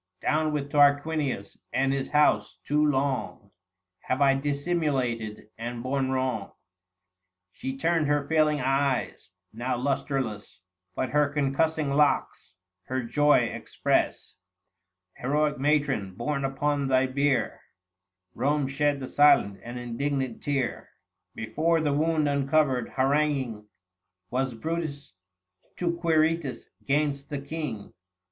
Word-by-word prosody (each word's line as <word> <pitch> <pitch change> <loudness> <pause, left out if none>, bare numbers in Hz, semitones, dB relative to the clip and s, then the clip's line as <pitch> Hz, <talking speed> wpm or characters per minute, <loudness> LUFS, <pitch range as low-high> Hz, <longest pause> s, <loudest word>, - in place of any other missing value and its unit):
Down 155 0 +1
with 145 -1 -3
Tarquinius 145 -5 +2
and 135 0 +1
his 135 -1 -2
house; 105 -10 +2
too 150 +1 +1
long 135 -7 -1 0.5
Have 130 - -2
I 140 -1 +5
dissimulated, 135 -7 -2
and 120 0 -5
borne 135 0 0
wrong! 130 -6 -2 0.5
" 90 0 -58
She 130 0 -4
turned 165 0 +1
her 145 -1 +1
failing 155 -1 +3
eyes, 135 -5 0 0.2
now 120 +3 -2
lustreless; 130 -7 -2 0.3
But 130 - -2
her 150 -1 +2
concussing 145 +1 0
locks 145 -9 +1 0.3
her 130 0 -2
joy 145 +5 +4
express: - - -1 0.8
900 125 - -3
Heroic 150 -1 +1
matron, 135 -9 +1
borne 140 +5 -2
upon 140 +1 0
thy 130 0 +3
bier 135 -1 0 0.7
Kome 140 +3 +1
shed 145 +1 0
the 130 - -4
silent 115 -10 +4
and 120 +1 -7
indignant 130 +1 -3
tear. 135 -4 -2 0.5
Before 165 +2 0
the 150 -2 +1
wound 155 0 +1
uncovered, 140 -3 +1
haranguing 135 -5 +1 0.6
Was 130 0 -1
Brutus, 155 - -4 0.6
to 170 -1 0
Quirites 160 -5 +1 0.2
'gainst 140 0 0
the 145 -2 -3
King. 140 -7 -6
140 Hz, 115 wpm, -27 LUFS, 130-150 Hz, 0.8 s, I